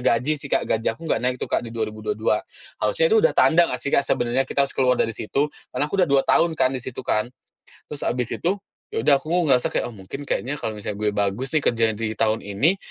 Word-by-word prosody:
gaji 125 +5 +2
sih 140 - -8
Kak, - - +2
gaji 110 0 0
aku 115 +9 -10
gak - - +1
naik 125 0 +1
tuh - - -3
Kak, - - +3
di 120 - -7
2022. 110 - -1 0.4
Harusnya - - +2
itu - - +6
udah - - +4
tanda 170 +1 +5
nggak 125 - -3
sih, 140 - -3
Kak, - - +4
sebenarnya 120 +2 +1
kita 140 - +2
harus - - -10
keluar 125 -2 +2
dari 115 - +1
situ, 140 +8 -2 0.2
karena 145 - -1
aku 150 - -5
udah 180 - +3
2 140 -1 +4
tahun 165 -1 +3
kan 130 0 +3
di 130 - -3
situ 130 - -6
kan. 105 +2 +1 0.6
Terus 150 - -6
habis 125 0 0
itu 190 +4 -1 0.4
ya - - 0
udah 145 +3 +6
aku 135 - -18 0.2
ngerasa 125 -2 +4
kayak, - - 0
"Oh, 115 - -13
mungkin 100 +9 -8
kayaknya 130 +4 -1
kalau 110 - -3
misalnya 105 0 -5
gue 105 -1 +1
bagus 105 +5 -1
nih - - +7
kerjaan 115 -1 +1
di 110 -1 -2
tahun 110 0 +1
ini, 120 - +2
125 Hz, 245 wpm, -23 LUFS, 110-145 Hz, 0.6 s, nih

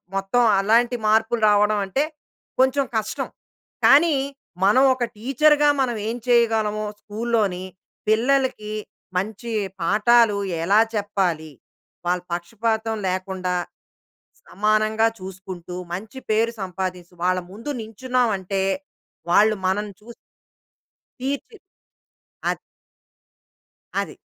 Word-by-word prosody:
మొత్తం 195 +5 +1 0.2
అలాంటి 230 +5 +3
మార్పులు 225 +2 +2
రావడం 210 0 +3
అంటే, 265 +9 0 0.6
కొంచెం 265 +1 +3
కష్టం. 215 -1 -3 0.6
కానీ, 300 +2 +6 0.5
మనం 215 +7 +5
ఒక 255 - -2
టీచర్‌గా 295 +5 +4
మనవేం 230 -2 -1
చేయగలవో, 220 -3 +2 0.2
స్కూల్‌లోని 210 -4 -1 0.5
పిల్లలకి 245 -1 +1 0.4
మంచి 215 +4 -3 0.3
పాఠాలు 215 +4 +4 0.3
ఎలా 200 +5 +5
చెప్పాలి? 185 -7 -1 0.5
వాళ్ళ 180 +1 +1
పక్షపాతం 220 +5 -1
లేకుండా, 185 0 -2 0.9
సమానంగా 215 +2 +2
చూసుకుంటూ, 185 -2 -8 0.2
మంచి 210 +8 -6
పేరు 225 +2 +2
సంపాదిస్తూ 180 -1 -5
వాళ్ళ 185 0 +2
ముందు 225 +8 -8
నించున్నాం 245 +3 0
అంటే, 190 +1 -2 0.7
వాళ్ళు 215 +5 +5
మనల్ని 200 +2 0
చూసి 235 +2 -12 1.1
కీర్తి. 280 - -4 0.9
అది. - - -2 1.4
అది. - - -5
215 Hz, 90 wpm, -23 LUFS, 190-235 Hz, 1.4 s, కానీ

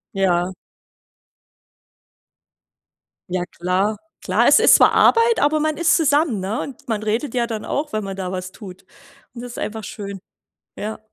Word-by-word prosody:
Ja. 185 -1 +1 2.8
Ja 180 0 -1
klar. 185 +5 -1 0.3
Klar, - - +2
es - - +7
ist - - +7
zwar - - +6
Arbeit, 460 0 +4
aber 300 +2 +2
man 310 0 -1
ist 340 0 +3
zusammen, 290 - +2
ne, 195 +4 -3
und 270 -3 -9
man 215 -2 -2
redet 225 +5 -2
ja 240 -1 +1
dann 220 -2 -5
auch, 295 -3 -3
wenn 215 - -1
man 195 -1 -5
da 190 -1 -4
was 185 0 -5
tut. 190 -2 -12 0.5
Und 235 - -8
das 245 0 -8
ist - - -8
einfach 220 0 -5
schön, 200 -2 -7 0.6
ja. 215 +1 -5
215 Hz, 160 wpm, -20 LUFS, 190-275 Hz, 2.8 s, es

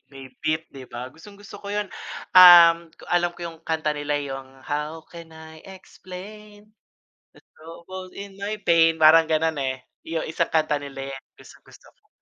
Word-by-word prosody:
may 135 -1 -12
beat 155 +1 -1
di 135 -2 -12
ba? 125 +2 -8
Gustong-gusto 205 +4 -14
ko 200 - -8
yun. 205 -1 -2 0.5
Um, 170 -2 +8
ko - - -20
alam 175 0 +2
ko - - -16
yung 165 -1 -10
kanta 160 -1 -1
nila 145 0 -3
yung 135 -1 -9
"How 150 +3 -4
can 165 -1 -12
I 160 0 -13
explain 200 +2 -12
in 215 +1 -32 0.4
the - - -20 0.2
trouble 170 +3 -11
in 200 -1 -10
my 205 +1 -5
pain" 165 -2 +3
parang 160 +1 +7
ganon, 160 -1 0
eh, 130 -1 -3 0.2
yung 165 0 -3
isang 165 +1 -2
kanta 155 -2 +1
nila 135 -1 -8
yan 135 - -9 0.2
gustong-gusto - - -18
ko. - - -38
165 Hz, 170 wpm, -23 LUFS, 150-185 Hz, 0.5 s, Um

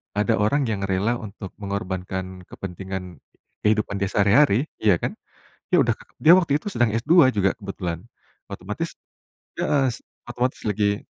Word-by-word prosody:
Ada 105 -1 +2
orang 140 +8 +2
yang 100 -2 -2
rela 100 +5 +1
untuk 100 -2 -8
mengorbankan 95 -2 -4
kepentingan 95 -2 -7 0.4
kehidupan 105 -2 +1
dia 100 - 0
sehari-hari, 115 +6 +4
ya 105 -4 +5
kan. - - -2 0.6
Dia - - +6
udah - - +2 0.3
dia 160 +2 +8
waktu 160 -6 +2
itu - - -8
sedang 120 - +1
S2 130 +4 +5
juga 95 -1 +3
kebetulan, 95 -4 -5 0.4
otomatis - - -5 0.7
heeh, 140 -2 +2 0.4
otomatis 125 +2 -1
lagi 105 -1 0
105 Hz, 135 wpm, -23 LUFS, 95-120 Hz, 0.7 s, dia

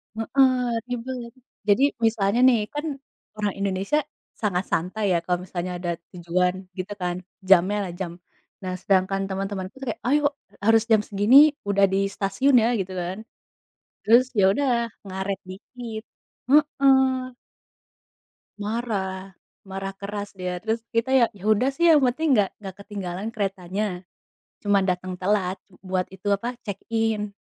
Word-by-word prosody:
Heeh, 260 +4 +3 0.4
ribet. 245 0 -5 0.4
Jadi, 210 +6 +4 0.2
misalnya 215 0 +2
nih, 245 -3 +5
kan 295 +2 -3 0.5
orang 210 -2 -1
Indonesia, 195 +8 0 0.4
sangat 190 -4 0
santai 185 +6 -1
ya, - - +3
kalau 180 0 0
misalnya 180 0 -4
ada 175 0 -4 0.2
tujuan, 180 +1 0 0.2
gitu 190 +3 -4
kan? 180 0 -1 0.3
Jamnya 195 +2 +5
lah. 180 - -5
jam. 175 -3 -3 0.5
Nah, 185 -1 -3
sedangkan 195 0 +2
teman-temanku 195 -1 -4
tuh 270 - -6
kayak, - - -5
"Ayo, 295 +3 +3 0.4
harus 225 0 +5
jam 220 -2 +5
segini, 205 +6 +4 0.3
udah 200 0 +5
di - - +3 0.2
stasiun 260 +8 +2
ya!" - - +3
gitu 190 0 -4
kan. 180 +2 -4 0.9
Terus, 235 +4 +7
ya 200 - +5
udah, 280 +4 0 0.4
ngaret 190 0 -3
dikit. 220 +3 -8 0.5
Heeh. 265 -3 +3 1.2
Marah. 200 -4 -3 0.3
Marah 195 0 -4
keras 200 +1 -6
dia. 180 -2 -4
Terus, 225 +1 -1
kita 230 +3 0
ya 260 -3 +6
ya 205 -3 -13
udah 215 +5 +3
sih, 330 +5 0
yang 300 - +5
penting 270 +4 +2
enggak 205 -5 +3
enggak 195 -3 -8
ketinggalan 200 0 -5
keretanya. 195 -3 -3 0.6
Cuma 205 -1 +3
datang 180 0 -2
telat, 190 -1 0 0.2
buat 185 -1 -1
itu, 190 +2 -6
apa, 230 +5 0
check 200 -4 -5
in. 220 -2 0
200 Hz, 140 wpm, -24 LUFS, 190-235 Hz, 1.2 s, Terus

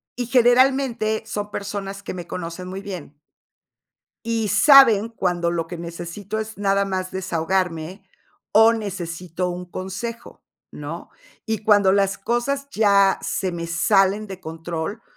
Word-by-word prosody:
y 245 - -3
generalmente 245 -2 +3
son 205 0 -5
personas 200 -1 -5
que - - -6
me 175 -2 -7
conocen 175 +1 -6
muy 190 +1 -6
bien 180 -7 -8 1.1
y 225 -2 -1
saben 230 -2 +7
cuando 180 -6 -1
lo 170 -1 -2
que 175 +1 -7
necesito 175 +5 -6
es 220 -1 -6
nada 200 0 +2
más 185 -1 -3
desahogarme 185 0 -2 0.5
o 225 +2 +7
necesito 180 -4 -4
un 180 0 -6
consejo, 195 +5 -6 0.3
¿no? - - -7 0.4
Y 220 -1 -1
cuando 205 -3 +5
las 200 0 +1
cosas 255 +6 -1
ya 200 -3 +4
se 185 -2 -2
me 170 -1 -4
salen 195 +5 +2
de 190 -2 -9
control, 165 +6 -5
195 Hz, 135 wpm, -22 LUFS, 180-220 Hz, 1.1 s, saben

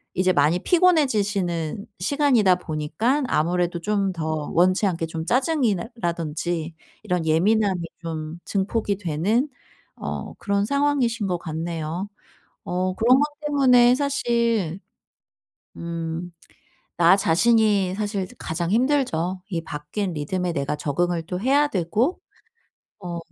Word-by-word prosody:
이제 185 0 +2
많이 150 +3 +3
피곤해지시는 205 - +1
시간이다 235 -3 +3
보니까 180 - -1
아무래도 175 0 0
좀 200 +1 0
더 155 -3 -3
원치 185 +4 +3
않게 165 -3 -1
좀 160 0 -5
짜증이 260 -3 +2
난다든지 170 -5 -3 0.3
이런 180 -5 -1
예민함이 190 +3 +2 0.2
좀 160 -1 -5
증폭이 200 +1 -1
되는 200 - 0 0.5
어 - - -5
그런 200 0 0
상황이신 265 -5 +1
것 180 -2 0
같네요. 165 +2 -4 0.6
어 185 +1 0
그런 240 +6 +5
것 - - +4 0.2
때문에 250 -4 +5
사실 235 - 0 1.0
음 170 +1 -5 0.7
나 175 +3 +6
자신이 200 +1 +3
사실 205 -2 -2
가장 165 +1 -3
힘들죠. 220 - +1
이 170 -4 -2
바뀐 160 +6 -4
리듬에 175 +4 -2
내가 140 -1 -1
적응을 170 +4 -1
또 180 -1 -3
해야 280 +5 +3
되고 215 - 0 0.9
어 175 -1 -4
185 Hz, 245 characters per minute, -23 LUFS, 165-230 Hz, 1.0 s, 나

